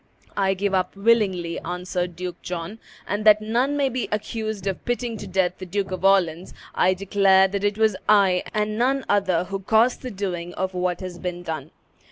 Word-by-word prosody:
"I 195 -1 +1
give 200 +1 -1
up 185 0 0
willingly," 195 -5 +1
answered 180 0 -4
Duke 180 0 -6
John; 180 +5 -5 0.3
"and 205 +2 -2
that 215 -1 +7
none 240 +7 0
may 280 -1 +2
be 255 -1 -3
accused 215 -1 -3
of 195 -2 -3
putting 245 -1 -2
to - - -8
death 180 -1 0
the 185 - -6
Duke 195 +1 -2
of 185 - -5
Orleans, 185 -3 +2 0.2
I 185 +1 +3
declare 195 0 +4
that 200 +1 -3
it 205 0 +1
was 220 -2 +3
I, 195 -4 +5
and 215 +1 -1
none 265 +2 +1
other, 190 -4 +2
who 195 +2 -5
caused 220 +5 +2
the 255 - -5
doing 180 -5 -4
of 190 0 -2
what 180 0 -1
has 180 -2 -7
been 180 -1 -5
done." 155 -4 -5
195 Hz, 195 wpm, -23 LUFS, 180-215 Hz, 0.3 s, that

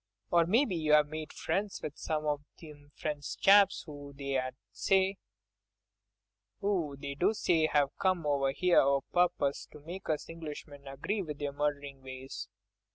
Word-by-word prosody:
"Or 170 -1 +4
maybe 225 +1 +3
you've 150 -2 +4
made 155 0 -5
friends 200 0 -2
with 150 - -4
some 155 -1 -2
of 145 -1 0 0.2
them 145 -2 -13
French 150 -1 -4
chaps 200 0 +5
'oo 145 -1 -9
they 135 -2 -1 2.2
do 150 -4 0
say 165 -6 +3
have 145 -2 +2
come 185 -4 +1
over 140 -2 +2
here 180 +5 +4
o' 140 0 +3
purpose 175 -6 +1
to 150 - -13
make 175 +6 -8
us 155 -2 -1
Englishmen 150 -3 -8
agree 145 +10 -2
with 150 -5 -5
their 145 -1 -3
murderin' 145 -1 -2
ways." 130 0 -7
150 Hz, 140 wpm, -31 LUFS, 140-170 Hz, 2.2 s, chaps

